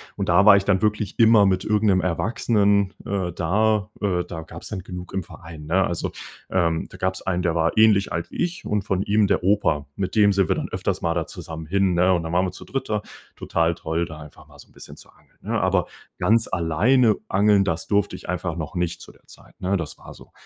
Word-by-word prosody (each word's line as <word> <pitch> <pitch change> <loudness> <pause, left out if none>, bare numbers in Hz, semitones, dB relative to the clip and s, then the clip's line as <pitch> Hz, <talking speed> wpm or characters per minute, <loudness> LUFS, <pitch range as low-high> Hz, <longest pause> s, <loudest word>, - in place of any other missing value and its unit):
Und - - -3
da 85 +3 +5
war 105 -2 +9
ich 100 - -1
dann 95 -2 +2
wirklich 105 -1 -1
immer 110 -2 +6
mit 95 -1 +1
irgend 105 0 0
'nem 95 -1 +3
Erwachsenen, 100 +2 +1
äh, 95 -3 -2
da. 105 +4 +1
Äh, 90 -4 0
da 80 -2 -7
gab's 80 +1 -10
dann 105 - -4
genug 90 0 -9
im 95 -1 -2
Verein, 80 -3 -11
ne? 95 +5 +2
Also, 85 - -3 0.4
ähm, 85 -3 0
da - - -12
gab's 95 0 -2
einen, 90 -1 -1
der 85 - +1
war 85 +3 0
ähnlich 110 -3 +4
alt 85 - -4
wie - - -8
ich 180 +3 -4
und 105 -1 0
von 95 -1 -1
ihm 105 0 +2
der 95 - 0
Opa- 80 -7 +1
mit 95 +2 -3
dem 105 -2 +5
sind 95 -2 +2
wir - - +2
dann - - -4
öfters - - -2
mal 85 -1 0
da 85 -1 -2
zusammen 80 0 -8
hin, 95 0 +1
ne? 90 +2 +3
Und 85 -2 0
dann 80 +1 -5
waren 90 +2 +2
wir 90 - -3
zu 90 - -11
dritt 135 - -4
da. 105 -1 0 0.3
Total 85 0 0
toll, 80 +1 -2
da 80 -2 -10
einfach 75 -1 -14
mal - - -18
so - - -14
'n - - -27
bisschen - - -12
zu - - -16
angeln, - - -27
ne? - - -2
Aber - - +1 0.3
ganz 115 +1 +2
alleine 105 +8 +3
angeln, 100 0 +3
das 85 -4 -2
durfte 100 -1 +1
ich - - -11
einfach 90 -2 -2
noch 80 0 -6
nicht 90 -1 -2
zu - - -11
der - - -27
Zeit, - - -18
ne? 95 +2 0
Das 80 -4 -6
war - - -12
so. - - -16
95 Hz, 245 wpm, -23 LUFS, 85-105 Hz, 0.4 s, war